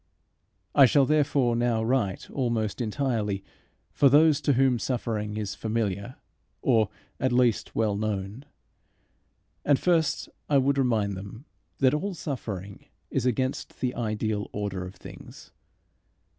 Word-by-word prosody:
I 135 -2 +8
shall 140 +1 +4
therefore 140 -4 +2
now 115 -1 +1
write 110 -6 0
almost 120 -4 -1
entirely 110 -4 -1 0.5
for 140 - +5
those 150 +1 +5
to 145 - +2
whom 130 -1 +3
suffering 110 -4 -2
is 105 -3 -3
familiar, 110 0 -2 0.5
or 110 -5 +3 0.3
at 130 - +1
least 120 -2 +1
well 110 -2 +1
known. 105 +4 -3 1.2
And 145 -2 +4
first 165 -2 +1 0.2
I 145 - +4
would 140 +1 +2
remind 110 -6 +1
them 100 +7 -9 0.3
that 130 -2 +3
all 185 +5 -2
suffering 105 - -6 0.2
is 125 - 0
against 130 +2 -2
the 125 -1 -1
ideal 110 -2 -2
order 100 -3 -3
of 90 - -11
things. - - -12
120 Hz, 130 wpm, -27 LUFS, 105-135 Hz, 1.2 s, I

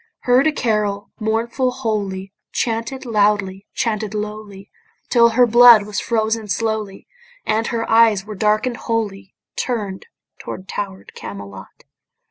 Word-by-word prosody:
Heard 255 +4 +4
a - - +3
carol, 210 -6 -1
mournful, 230 +4 0
holy, 205 -6 -3 0.2
Chanted 230 +3 -2
loudly, 205 -3 +1
chanted 215 -4 -2
lowly, 210 -2 -6 0.4
Till 235 -2 +5
her 245 +2 +4
blood 235 -2 +8
was 210 -1 -3
frozen 220 -1 -1
slowly, 215 -1 -3 0.4
And 220 +1 0
her 230 -1 -2
eyes 225 -3 +4
were 215 - -7
darken'd 215 +4 +1
wholly, 205 -5 -3 0.2
Turn'd 205 -6 -3 0.3
to - - -6
tower'd 195 -1 -6
Camelot. 100 -1 -10
215 Hz, 120 wpm, -20 LUFS, 200-230 Hz, 0.4 s, blood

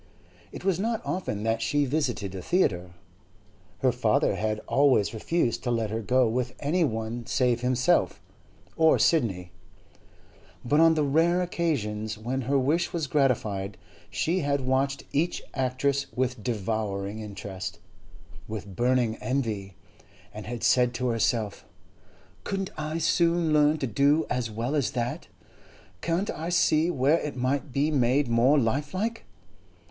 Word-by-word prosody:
It - - -9
was 190 -3 +1
not 225 +2 0
often 105 - -3
that 115 0 0
she 145 +4 +1
visited 125 -9 -2
a 95 - -5
theatre 90 - 0 0.9
(her 130 - +4
father 115 -4 +1
had 110 +1 -1
always 135 -8 +2
refused 120 +2 0
to 125 - -2
let 115 -3 0
her 110 +1 -2
go 125 +3 +3
with 125 +2 -2
any 170 +5 +1
one 115 -2 -3
save 125 -2 +1
himself 125 0 +2 0.6
or 160 -1 +4
Sidney), 95 - +1 1.1
but 145 +5 +3
on 165 0 +6
the 155 - +2
rare 165 +5 +2
occasions 110 -12 -2
when 125 +5 -3
her 140 - +3
wish 145 +6 +1
was 170 -4 -2
gratified, 110 -9 0 0.3
she 160 - 0
had 140 -3 0
watched 135 +1 0
each 165 +5 0
actress 135 +1 0
with 125 -3 -1
devouring 105 -2 -2
interest, 100 -2 -6 0.7
with 100 -3 -7
burning 120 0 +1
envy, 110 -8 -3 0.6
and 105 0 -8
had 120 0 -5
said 125 -1 +3
to 125 +1 -1
herself, 115 -2 0 0.8
'Couldn't 195 -1 -3
I 155 +1 -3
soon 170 0 +2
learn 150 +1 +4
to 140 - -2
do 140 +7 +2
as 125 -2 -1
well 115 +5 -3
as 145 -4 +1
that? 125 +6 -3 0.7
Can't 170 +4 -1
I 165 +2 -5
see 170 -2 +3
where 150 +1 +2
it 150 - -5
might 135 +3 -1
be 145 +4 +1
made 135 0 +2
more 120 +5 +4
lifelike? 150 - -1
130 Hz, 140 wpm, -27 LUFS, 110-150 Hz, 1.1 s, on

